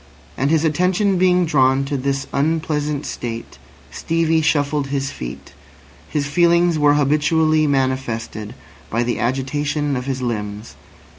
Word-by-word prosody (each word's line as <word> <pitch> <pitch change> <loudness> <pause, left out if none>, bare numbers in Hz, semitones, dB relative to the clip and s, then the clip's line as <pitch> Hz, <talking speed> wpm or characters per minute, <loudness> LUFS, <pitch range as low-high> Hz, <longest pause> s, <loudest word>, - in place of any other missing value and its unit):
And 135 +2 0
his 160 0 +2
attention 180 +4 +1
being 180 -1 +3
drawn 135 -3 +2
to 140 +1 -3
this 135 0 -1
unpleasant 150 -1 -1
state, 115 -1 -6 0.3
Stevie 165 -1 +1
shuffled 145 -2 +1
his 135 -1 -2
feet. 60 0 -8 0.6
His 145 -2 -1
feelings 170 +2 +3
were 145 0 +4
habitually 155 +2 +2
manifested 130 -6 -2 0.3
by 115 +2 0
the 120 0 -2
agitation 145 +3 -1
of 125 +1 -4
his 130 -1 -2
limbs. 105 -2 -4
145 Hz, 130 wpm, -20 LUFS, 130-160 Hz, 0.6 s, were